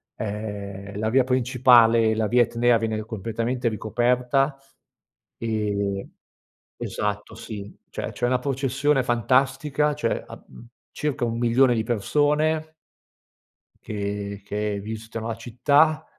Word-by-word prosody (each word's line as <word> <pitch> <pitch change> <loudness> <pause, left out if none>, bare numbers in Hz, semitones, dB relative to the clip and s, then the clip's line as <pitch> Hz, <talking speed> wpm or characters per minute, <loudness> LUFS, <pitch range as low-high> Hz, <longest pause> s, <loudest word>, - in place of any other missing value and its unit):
ehm, 100 -2 -5
la 110 0 0
via 130 +2 +4
principale, 120 -3 +4
la 110 -1 0
via 120 +3 +4
Etnea, 120 +1 +2
viene 110 -1 -2
ri 110 - -2
completamente 115 +3 -2
ricoperta. 125 +5 +1 0.8
Ehm 100 -3 -2 0.7
esatto 105 +1 -3
sì, 105 -3 -8 0.2
cioè - - -5
c'è 120 - -2
una 125 0 +2
processione 135 +1 +1
fantastica, 135 +5 +1
cioè 115 -6 -1
am 120 - -13 0.2
circa 145 -3 -2
1000000 120 +2 +3
di 110 - 0
persone 150 +8 +1 1.1
che 100 -1 -4
che 105 0 -2
visitano 110 +2 -6
la 115 - -3
città. 145 +7 +2
115 Hz, 110 wpm, -24 LUFS, 110-130 Hz, 1.1 s, via